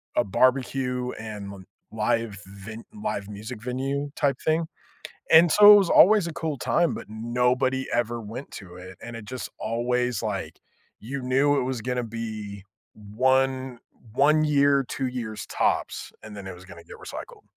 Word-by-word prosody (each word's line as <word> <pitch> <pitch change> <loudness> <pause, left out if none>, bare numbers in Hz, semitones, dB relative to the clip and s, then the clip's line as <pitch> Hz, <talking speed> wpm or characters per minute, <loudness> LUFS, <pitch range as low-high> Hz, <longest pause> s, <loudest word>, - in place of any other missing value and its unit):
a - - +3
barbecue 125 +3 +1
and 100 -3 -7 0.3
live 110 -1 -1
ven 100 +4 -10 0.2
live 100 - -3
music 105 +2 -8
venue 135 +3 -2
type 140 -1 +1
thing. 160 +1 +1 0.7
And 165 +1 +8
so 210 +3 +9
it - - +9
was 195 -4 +2
always 205 -2 +6
a 170 - -5
cool 155 -3 -3
time, 170 +6 +1
but - - -7
nobody 125 +4 0
ever 120 0 0
went 115 +6 -8
to 90 -3 -10
it. 90 0 -11
And 120 0 -8
it 115 - -8
just 130 +3 -6
always, 120 0 -1
like, 105 -3 -4 0.4
you 135 +5 -5
knew 135 +3 +2
it - - -1
was 130 -1 -2
gonna 125 +1 -2
be 110 -3 -6 0.3
1 130 +4 0 0.3
1 150 +4 +4
year, 140 -2 +3
2 135 - -2
years 115 -4 -5
tops, - - -1
and 110 -1 -10
then 100 -1 -8
it 95 - -6
was 90 +1 -14
gonna 85 -2 -13
get - - -12
recycled. - - -9
125 Hz, 165 wpm, -25 LUFS, 110-135 Hz, 0.7 s, so